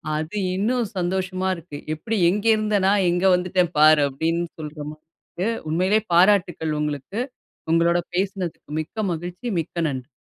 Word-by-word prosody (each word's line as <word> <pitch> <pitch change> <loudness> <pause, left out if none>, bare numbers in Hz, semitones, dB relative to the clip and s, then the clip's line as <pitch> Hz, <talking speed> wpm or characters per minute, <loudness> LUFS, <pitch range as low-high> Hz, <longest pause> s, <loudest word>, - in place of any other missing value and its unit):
அது 155 +5 -4 0.2
இன்னும் 235 +5 +1
சந்தோஷமா 185 +1 -1
இருக்கு. 165 -3 -9 0.2
எப்டி 220 +8 -3
எங்கே 210 +4 +1
இருந்த 215 -1 0
நா, - - +5 0.2
எங்க 175 +2 0
வந்துட்டேன் 180 -1 +1
பாரு 155 0 +7
அப்டின் 165 +5 -1 0.2
சொல்ற 150 0 -7
மாரி 155 0 -14 0.2
இருக்கு. 185 +4 -5 0.2
உண்மையிலேயே 185 +7 +2
பாராட்டுக்கள் 175 -4 +3
உங்களுக்கு, 150 - -3 0.5
உங்களோட 170 +1 +3 0.2
பேசனதுக்கு 185 -4 -3
மிக்க 215 +7 -5
மகிழ்ச்சி, 175 +8 -5
மிக்க 165 - -12
நன்றி! 130 -2 -5
175 Hz, 140 wpm, -23 LUFS, 155-195 Hz, 0.5 s, பாரு